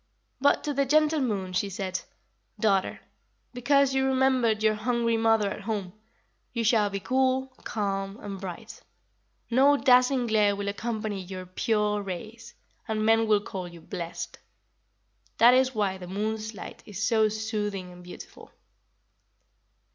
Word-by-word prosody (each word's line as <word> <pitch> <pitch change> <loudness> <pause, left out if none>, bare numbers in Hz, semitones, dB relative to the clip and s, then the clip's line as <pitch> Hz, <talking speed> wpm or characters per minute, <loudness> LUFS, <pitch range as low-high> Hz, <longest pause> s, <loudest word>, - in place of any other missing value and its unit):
"But 285 +2 +3
to 295 - -2
the 280 0 +2
gentle 305 +3 +3
Moon 195 -7 -2
she 200 +2 0
said: 190 -2 -3 0.6
'Daughter, 195 -4 +1 0.5
because 275 +2 +3
you 265 0 +2
remembered 260 -4 +2
your 215 0 +4
hungry 230 +1 0
mother 225 -2 +3
at - - -6
home, 200 -3 -4 0.6
you 235 -1 -1
shall 215 -2 +3
be 200 0 -4
cool, 260 +3 0
calm, 195 -1 -2
and 200 -2 -7
bright. 180 -3 -8 0.7
No 275 +4 +5
dazzling 255 -1 +4
glare 210 -3 +3
will 200 0 -3
accompany 215 -1 -3
your 185 0 -7
pure 210 +2 0
rays, 215 +5 -8 0.3
and 215 -1 -1
men 225 0 +4
will 210 -1 +3
call 190 -3 -6
you 170 -1 -12
"blessed."' 170 0 -6 1.0
That 240 +2 +7
is 260 0 +3
why 195 -3 0
the 180 - -8
moon's 215 +3 -3
light - - -9
is 205 0 -5
so 220 -2 +3
soothing 210 -4 -3
and 180 0 -13
beautiful." 180 - -12
215 Hz, 145 wpm, -27 LUFS, 195-245 Hz, 1.0 s, That